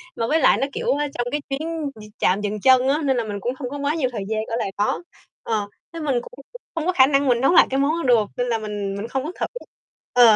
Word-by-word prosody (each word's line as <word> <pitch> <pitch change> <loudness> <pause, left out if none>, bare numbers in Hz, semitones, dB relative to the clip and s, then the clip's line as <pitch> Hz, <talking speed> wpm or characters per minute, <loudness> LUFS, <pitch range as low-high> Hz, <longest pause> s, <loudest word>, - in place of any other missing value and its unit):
mà 230 - -1
với 320 +2 +2
lại - - +5
nó, 270 - 0
kiểu, - - -1
a, 295 - 0
trong 240 0 -1
cái 295 0 -1
chuyến 310 +1 -3
d 215 - -12 0.2
trạm 190 +3 +2
dừng 210 0 -2
chân 260 0 +5
á, 290 +3 +2
nên 265 -2 +2
là 235 - +1
mình 205 -2 -5
cũng 245 +5 -1
hông 255 -4 -4
có 285 - -5
quá 285 +2 0
nhiều 265 -6 0
thời 215 -5 -4
gian 220 0 -1
ở 230 - -2
lại 195 - -2
đó. 210 +11 0 0.4
Ờ, 215 -3 -1 0.3
thế 335 - -6
mình 295 -4 0
cũng 250 - -13 0.4
không 325 -1 -2
có 365 - +1
khả 260 -5 +6
năng 280 0 +2
mình 245 -2 +3
nấu 270 - +4
lại - - +7
cái 270 +1 0
món 280 +2 +3 0.2
đó 245 - +6
được, 220 -3 +4
nên 245 0 0
là 235 -2 +1
mình 205 -2 -4
mình 205 +3 -4
không 265 +2 -2
có 310 - -4
thử - - +1 0.7
Ờ.. 240 -3 +7
250 Hz, 290 wpm, -22 LUFS, 220-285 Hz, 0.7 s, lại